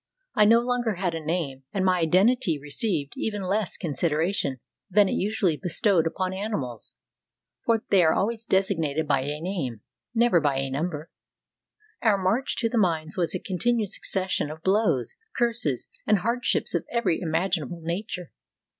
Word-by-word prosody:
I 210 Hz, -, +5 dB
no 230 Hz, +2 st, +6 dB
longer 240 Hz, -3 st, 0 dB
had 180 Hz, -2 st, -1 dB
a 165 Hz, -1 st, -4 dB
name 155 Hz, -5 st, -2 dB
and 190 Hz, -2 st, 0 dB
my 185 Hz, -1 st, +3 dB
identity 185 Hz, -, +3 dB
received 145 Hz, +1 st, -2 dB
even 210 Hz, -3 st, -2 dB
less 195 Hz, +2 st, -1 dB
consideration 155 Hz, -1 st, -1 dB, 0.3 s
than 205 Hz, +1 st, +5 dB
is -, -, -1 dB
usually 190 Hz, -5 st, 0 dB
bestowed 175 Hz, 0 st, +2 dB
upon 185 Hz, +3 st, -2 dB
animals, 190 Hz, -, -4 dB, 0.7 s
for 225 Hz, -1 st, +1 dB
they 195 Hz, -2 st, +6 dB
are 160 Hz, -, +5 dB
always 225 Hz, +3 st, -1 dB
designated 165 Hz, -7 st, +1 dB
by 140 Hz, -2 st, +2 dB
a 145 Hz, +3 st, -3 dB
name, 155 Hz, -, -3 dB, 0.3 s
never 230 Hz, -7 st, +4 dB
by 145 Hz, -3 st, +1 dB
a 135 Hz, 0 st, -2 dB
number. 155 Hz, +2 st, -3 dB, 0.9 s
Our 215 Hz, -4 st, +4 dB
march 195 Hz, +8 st, 0 dB
to 230 Hz, -, +1 dB
the 230 Hz, 0 st, 0 dB
mines 165 Hz, -4 st, 0 dB
was 175 Hz, 0 st, 0 dB
a -, -, -1 dB
continued 215 Hz, +3 st, 0 dB
succession 185 Hz, -5 st, -1 dB
of 155 Hz, +1 st, -9 dB
blows, 190 Hz, -, +1 dB, 0.2 s
curses, 230 Hz, -, +1 dB, 0.2 s
and 215 Hz, -, +5 dB
hardships 235 Hz, +6 st, +1 dB
of -, -, -1 dB
every 225 Hz, -9 st, 0 dB
imaginable 170 Hz, -1 st, -1 dB
nature. 180 Hz, +1 st, -4 dB
180 Hz, 155 wpm, -26 LUFS, 155-210 Hz, 0.9 s, no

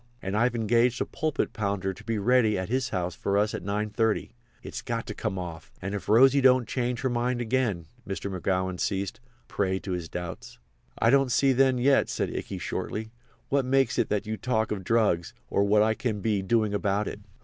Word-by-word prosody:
And 95 Hz, -1 st, -4 dB
I've 120 Hz, +2 st, +2 dB
engaged 115 Hz, +2 st, +2 dB
a -, -, 0 dB
pulpit 155 Hz, -2 st, -2 dB
pounder 100 Hz, -2 st, -1 dB
to 110 Hz, -, -14 dB
be 115 Hz, 0 st, -2 dB
ready 110 Hz, 0 st, +3 dB
at 95 Hz, +1 st, -3 dB
his 125 Hz, 0 st, 0 dB
house 90 Hz, -1 st, -2 dB
for 100 Hz, 0 st, -1 dB
us 105 Hz, +1 st, +1 dB
at -, -, -4 dB
9.30. 105 Hz, +2 st, -1 dB, 0.3 s
It's -, -, -6 dB
got -, -, -3 dB
to -, -, -5 dB
come 95 Hz, -, -3 dB
off. 85 Hz, -3 st, -7 dB
And 95 Hz, +2 st, -4 dB
if 100 Hz, -, -5 dB
Rosy 135 Hz, +5 st, +6 dB
don't 130 Hz, -2 st, +5 dB
change 125 Hz, -1 st, -2 dB
her 130 Hz, -, 0 dB
mind 120 Hz, +1 st, 0 dB
again!"—Mr. 110 Hz, -4 st, -2 dB
McGowan 95 Hz, 0 st, -1 dB
ceased, 100 Hz, -1 st, -2 dB
a 120 Hz, -1 st, -34 dB
prey 95 Hz, -2 st, 0 dB
to 95 Hz, -, -5 dB
his 90 Hz, -2 st, -3 dB
doubts. 90 Hz, -2 st, -7 dB, 0.4 s
"I 115 Hz, -, +3 dB
don't 135 Hz, -2 st, +4 dB
see 135 Hz, +2 st, +4 dB
then 130 Hz, 0 st, +3 dB
yet," 135 Hz, +3 st, +3 dB
said -, -, -2 dB
Ikey, -, -, -4 dB
shortly, 110 Hz, +1 st, -4 dB, 0.4 s
"what 140 Hz, -1 st, +2 dB
makes 135 Hz, +1 st, +2 dB
it 115 Hz, -, +1 dB
that 105 Hz, 0 st, 0 dB
you 110 Hz, +1 st, -3 dB
talk 110 Hz, -3 st, 0 dB
of 100 Hz, -3 st, -3 dB
drugs, 100 Hz, -6 st, +1 dB, 0.2 s
or 100 Hz, -, +3 dB
what 105 Hz, +1 st, +4 dB
I 110 Hz, 0 st, +2 dB
can 110 Hz, -1 st, -2 dB
be 105 Hz, -1 st, 0 dB
doing 110 Hz, +1 st, +1 dB
about 100 Hz, 0 st, 0 dB
it." -, -, -5 dB
110 Hz, 205 wpm, -27 LUFS, 100-125 Hz, 0.4 s, Rosy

